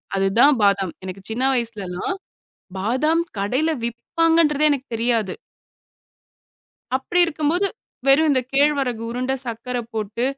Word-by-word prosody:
அதுதான் 195 +9 +4
பாதாம். 195 -3 +2
எனக்கு 185 +1 -7
சின்ன 240 +4 -2
வயசுலாம் 220 - -2 0.6
பாதாம் 260 - +1 0.2
கடைல 255 +11 +1
விப்பாங்கன்றதே 305 +5 +2
எனக்கு 275 -1 -2
தெரியாது. 230 -3 0 1.6
அப்படி 270 +7 -2
இருக்கும்போது 325 +4 0 0.4
வெறும் 285 +4 +5
இந்த 265 -2 +3
கேழ்வரகு 275 -4 +2
உருண்ட, 255 +2 -2
சர்க்கர 240 +2 -4 0.2
போட்டு 215 +2 -2
250 Hz, 105 wpm, -22 LUFS, 220-295 Hz, 1.6 s, வெறும்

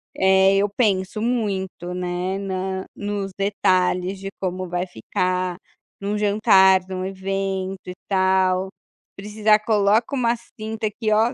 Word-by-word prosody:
É, 190 0 +4
eu 205 +1 +2
penso 200 -3 0
muito, 195 -7 -2
né, 180 +1 -2
na 190 -1 -3
nos 205 -1 -4
detalhes 185 -1 +1
de 195 0 -5
como 185 -1 -3
vai 180 +1 -1
ficar, 180 +6 -2 0.4
em 200 - -8
um 210 +1 0
jantar, 200 -3 +5
em - - -5
um 185 0 -3
evento 195 0 -3
e 180 - -6
tal, 190 -1 +2 0.5
Precisar 210 +1 +2
coloca 215 +4 +2
uma 240 -2 +2
cinta 220 -1 -7
aqui 215 +1 -2
ó, 225 +4 +3
195 Hz, 140 wpm, -22 LUFS, 185-210 Hz, 0.5 s, jantar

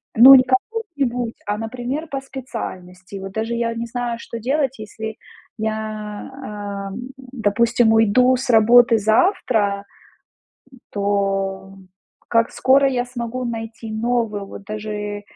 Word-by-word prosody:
Ну, 255 +4 +10
не 255 - +7
кому-нибудь, 260 - -2
а, 205 0 -1
например, 250 +7 -4
по 275 -2 -4
специальности. 200 -9 -8
Вот 195 0 -8
даже 225 +2 -2
я 235 0 -1
не 230 0 -3
знаю, 240 0 -3
что 235 - -7
делать, 265 +1 -1
если 220 +1 -7 0.4
я, 220 0 -1 0.7
а, 205 -2 -6
м, 245 +4 -7
допустим, 235 -2 +1
уйду 225 +4 +4
с 260 0 -5
работы 230 +1 +6
завтра, 220 - +1 0.9
м, 260 - -17
то 195 -1 -1 0.5
как 230 0 +2
скоро 275 +1 +4
я 250 -2 0
смогу 245 0 -4
найти 225 -1 -6
новую, 220 -2 -1
вот 195 - -10
даже 210 -1 -5
230 Hz, 130 wpm, -21 LUFS, 210-250 Hz, 0.9 s, Ну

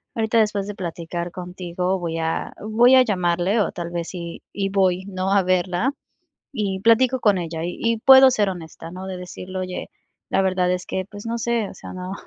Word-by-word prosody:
ahorita 225 0 +2
después 210 -2 +1
de 205 - -5
platicar 170 -1 -5
contigo, 180 +1 -3
voy 165 -1 -3
a 160 0 -2
voy 235 +5 +5
a 255 - +7
llamarle, 185 0 +1
o - - 0
tal 170 -1 -6
vez 170 -1 -3
y 170 -2 -7
y 195 -1 -1
voy, 190 -1 +1
¿no?, 190 0 -2
a 195 -2 +4
verla, 185 +7 +1 0.6
y 200 -6 -2
platico 245 +4 +4
con 205 -3 +3
ella 165 -2 -4
y 175 - -4
y 230 -1 +1
puedo 265 +2 +8
ser 210 -5 +1
honesta, 165 -2 -8
¿no?, 185 +2 -7
de 190 -1 -5
decirle 180 +1 -7
oye, 185 0 -5 0.4
la 195 - +2
verdad 185 -1 +1
es 180 0 -2
que 190 0 -3
pues 205 +1 -9
no 230 +1 -2
sé, 235 -2 0
o - - -11
sea, - - -10
no 185 +1 -6
190 Hz, 205 wpm, -22 LUFS, 180-215 Hz, 0.6 s, puedo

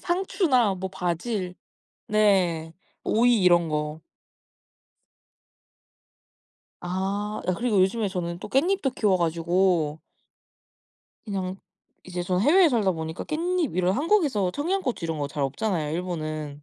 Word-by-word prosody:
상추나 345 - +1
뭐 190 +1 -4
바질 180 +2 -3 0.5
네 185 -6 +2 0.3
오이 235 -1 +3
이런 175 -2 +4
거. 150 +1 -3 2.8
아 195 +4 -3
아 185 - +1
그리고 215 0 +1
요즘에 200 +3 +1
저는 175 -2 -4
또 - - -8
깻잎도 280 - +1
키워 200 -6 +2
가지고 170 -2 +1 1.2
그냥 190 -3 -3 0.5
이제 180 -1 -4
저는 180 +1 0
해외에 340 +6 +6
살다 215 -8 +2
보니까 160 0 -5
깻잎 335 - -1
이런 185 +1 +2
한국에서 290 - +2
청양고추 300 - -2
이런 165 -1 -3
거 145 - -1
잘 145 0 -3
없잖아요 155 +2 -1
일본은. 155 -4 -4
190 Hz, 245 characters per minute, -25 LUFS, 170-240 Hz, 2.8 s, 해외에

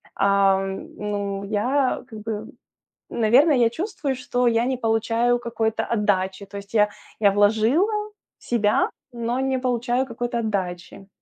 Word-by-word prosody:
Ам, 195 -1 +1
ну 200 -1 -3
я, 250 +7 0
как 220 -3 -9
бы, 225 +1 -4
м, 210 - -7 0.6
наверное, 255 +7 +4
я 235 -2 +4
чувствую, 320 - -3
что 250 0 -1
я 230 0 +3
не 260 0 0
получаю 230 +1 +1
какой-то 225 -2 -1
отдачи, 200 -3 0
то 200 +1 -10
есть 200 +2 -12
я 210 -1 +5 0.3
я 200 -2 +5
вложила 220 - +3 0.5
себя, 215 -3 +1 0.2
но 235 +2 -2
не 265 0 0
получаю 250 0 0
какой-то 240 0 -3
отдачи. 190 -3 -4
225 Hz, 140 wpm, -23 LUFS, 205-245 Hz, 0.6 s, я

